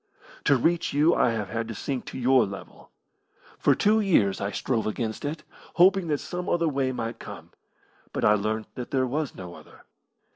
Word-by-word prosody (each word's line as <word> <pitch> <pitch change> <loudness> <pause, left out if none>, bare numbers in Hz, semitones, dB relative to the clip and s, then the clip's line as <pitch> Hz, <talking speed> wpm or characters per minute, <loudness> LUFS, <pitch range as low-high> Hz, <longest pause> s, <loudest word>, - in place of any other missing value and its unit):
"To 140 - +5
reach 165 +6 +1
you 150 +4 +4
I - - +3
have 110 -4 -2
had 115 +2 -3
to 115 - -6
sink 130 +5 -4
to - - -7
your 130 0 +4
level. 100 0 -10 0.7
For - - +4
two 215 +2 +3
years 110 - +2
I 100 - -1
strove 110 +3 -1
against 110 0 -3
it, 150 +1 -4 0.3
hoping 185 +1 +5
that 150 -2 +1
some 180 +4 -5
other 170 -1 +2
way 135 -3 0
might 115 -2 -4
come, - - -10 0.6
but - - -1
I 105 - +6
learnt 110 +1 -1
that 125 - -6
there 130 -1 +1
was 145 +3 -2
no 90 -2 -8
other. - - -15
130 Hz, 190 wpm, -26 LUFS, 110-155 Hz, 0.7 s, I